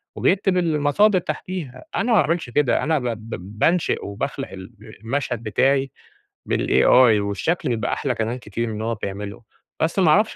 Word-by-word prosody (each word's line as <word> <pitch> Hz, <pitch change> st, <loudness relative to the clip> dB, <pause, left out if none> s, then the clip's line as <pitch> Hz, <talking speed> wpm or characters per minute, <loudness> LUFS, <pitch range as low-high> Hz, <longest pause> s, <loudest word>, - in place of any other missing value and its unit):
وبيكتب 190 Hz, -1 st, +2 dB
المصادر 170 Hz, +5 st, +3 dB
تحتيها، 165 Hz, -7 st, -6 dB
أنا -, -, +1 dB
ما 210 Hz, -, +6 dB
باعملش 165 Hz, -2 st, -1 dB
كده 145 Hz, 0 st, +1 dB
أنا 155 Hz, -1 st, +1 dB
ب 125 Hz, -, -6 dB
ب 110 Hz, -3 st, -6 dB
بانشئ 175 Hz, +1 st, +1 dB
وباخلق 135 Hz, +7 st, -4 dB
الب 95 Hz, +3 st, -11 dB, 0.2 s
المشهد 120 Hz, -1 st, -2 dB
بتاعي 135 Hz, +5 st, +1 dB, 0.6 s
بالAI، 125 Hz, -4 st, +5 dB
والشكل 130 Hz, -, -1 dB
بيبقى 115 Hz, -2 st, -1 dB
أحلى 130 Hz, -4 st, -1 dB
كمان 115 Hz, +2 st, -2 dB
كتير 115 Hz, 0 st, -4 dB
من 110 Hz, -, -4 dB
اللي 105 Hz, -, -4 dB
هو 115 Hz, 0 st, -1 dB
بيعمله، 100 Hz, +1 st, -6 dB, 0.4 s
بس 165 Hz, +4 st, +1 dB
ما 170 Hz, -5 st, +4 dB
أعرفش 210 Hz, +7 st, +3 dB
130 Hz, 160 wpm, -22 LUFS, 110-160 Hz, 0.6 s, ما